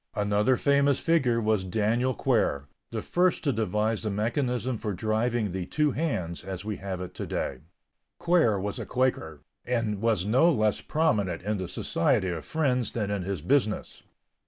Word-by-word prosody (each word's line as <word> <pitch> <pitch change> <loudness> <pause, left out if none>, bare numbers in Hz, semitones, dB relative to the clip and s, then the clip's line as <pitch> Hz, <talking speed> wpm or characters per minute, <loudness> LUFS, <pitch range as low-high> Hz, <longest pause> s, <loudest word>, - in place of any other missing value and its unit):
Another 105 +5 +2
famous 140 0 +3
figure 135 -8 +2
was 110 -3 +1
Daniel 110 +6 0
Quare, 70 -7 +1 0.2
the - - -4
first 180 0 +1
to 140 -4 +1
devise 110 +1 0
the 110 - -2
mechanism 120 +3 -1
for 105 -2 -3
driving 110 +2 0
the 90 -1 -4
two 150 -1 +1
hands 95 - -2
as 95 0 -6
we 105 -2 -3
have 95 -2 -5
it 90 0 -7
to - - -5
day. - - -3 0.6
Quare 165 - +3
was 100 +1 -4
a - - -4
Quaker, 100 - -1 0.2
and 115 -5 -1
was 110 -5 +1
no 130 +11 +4
less 110 -7 +1
prominent 105 - 0
in 105 0 -1
the 95 - -3
Society 95 +1 0
of 85 -3 -4
Friends 125 -7 0
than 105 -3 -2
in 100 -2 -1
his 90 -4 -4
business. 110 0 0
110 Hz, 170 wpm, -27 LUFS, 100-130 Hz, 0.6 s, no